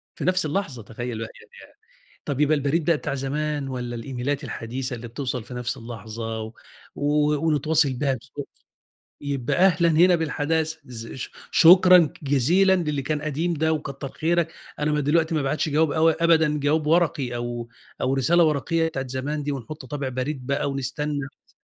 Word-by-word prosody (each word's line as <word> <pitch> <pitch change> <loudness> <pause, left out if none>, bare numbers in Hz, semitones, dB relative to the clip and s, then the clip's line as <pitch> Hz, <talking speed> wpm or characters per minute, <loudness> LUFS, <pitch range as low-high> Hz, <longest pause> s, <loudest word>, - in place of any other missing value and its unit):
في - - -5
نفس 185 -1 +2
اللحظة، 150 - -3
تخيّل 120 +2 -5
بقى 115 0 -5 0.3
يعني - - -16 0.5
طَب 140 -1 -3
يبقى 150 +1 +4
البريد 145 +3 0
بقى 165 +1 +3
بتاع 140 - -4
زمان 145 +1 -2
والّا 125 -2 -4
الإيميلات 135 +4 -3
الحديثة 125 +2 -4
اللي 120 +1 -8
بتوصل 125 -1 -4
في 125 - -10
نَفْس 125 +2 -3
اللحظة 115 -1 -6
و 110 0 -7 0.4
و 150 +1 +2
ونتواصل 155 -1 +2
بيها 135 +1 0
بسرعة 120 - -8 0.8
يبقى 140 -1 -2
أهلًا 175 -2 +4
هنا 175 +3 +5
بالحداثة. 160 0 -1
إز 115 -2 -8
ش 130 - -6 0.2
شكرًا 180 -1 +7
جزيلًا 165 +8 +3
للي 150 -6 -1
كان 150 +2 -2
قديم 155 +4 -1
ده 160 0 +1
وكتَّر 140 -3 -5
خيرك، 170 0 0 0.3
أنا 150 +1 +1
ما 150 - +1
دلوقتي 160 +3 +2
ما 155 - +1
بابعتش 150 +4 -1
جواب 155 +1 +2
أو 160 +2 +4
أبدًا 160 -2 +3
جواب 150 +2 +1
ورقي 150 -7 +2
أو 120 -1 -4 0.3
أو 130 - +1
رسالة 160 +6 +4
ورقيّة 165 +2 +1
بتاعة 135 -4 -4
زمان 140 +4 -3
دي 145 - -2
ونحُط 140 +2 -7
طابع 140 0 -4
بريد 130 +1 -4
بقى 140 0 0
ونستنّى 140 +1 -3 0.2
س - - -28
145 Hz, 170 wpm, -24 LUFS, 130-160 Hz, 0.8 s, شكرًا